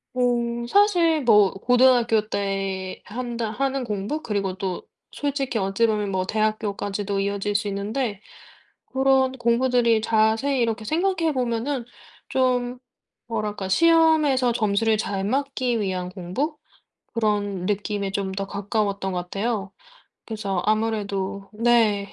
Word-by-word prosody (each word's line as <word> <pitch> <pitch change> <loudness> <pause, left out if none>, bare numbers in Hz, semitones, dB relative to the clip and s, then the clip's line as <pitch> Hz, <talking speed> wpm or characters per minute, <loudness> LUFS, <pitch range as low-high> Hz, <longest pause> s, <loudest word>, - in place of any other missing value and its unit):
어 240 -1 0
사실 345 - +3
뭐 210 -5 +5
고등학교 240 0 +3
때 195 -2 -3
한다 235 0 -4
하는 270 +3 -1
공부 210 +8 -3
그리고 200 -7 -2
또 185 -1 -4 0.3
솔직히 275 -4 -2
어찌 195 +3 +1
보면 210 -2 -1
뭐 185 -1 -1
대학교까지도 205 -1 -1
이어질 200 +1 -2
수 205 0 +1
있는데 205 +2 -2 0.7
고런 265 0 +3
공부들이 240 -2 +2
자세히 225 +5 +2
이렇게 225 -1 -1
생각해 335 - +1
보면은 250 0 -1 0.4
좀 250 -1 0 0.5
뭐랄까 210 -4 -3
시험에서 315 - +4
점수를 220 -1 +1
잘 200 -2 -2
맞기 255 +1 -1
위한 185 -3 -2
공부 185 - -3 0.6
그런 205 -5 -1
느낌에 205 -1 -2
좀 195 -1 -2
더 195 +1 -3
가까웠던 200 -1 -2
것 180 -1 -2
같아요. 200 +1 -3 0.5
그래서 210 -4 -2
아무래도... 205 -3 -1
네. 215 -3 +2
220 Hz, 270 characters per minute, -24 LUFS, 200-250 Hz, 0.7 s, 뭐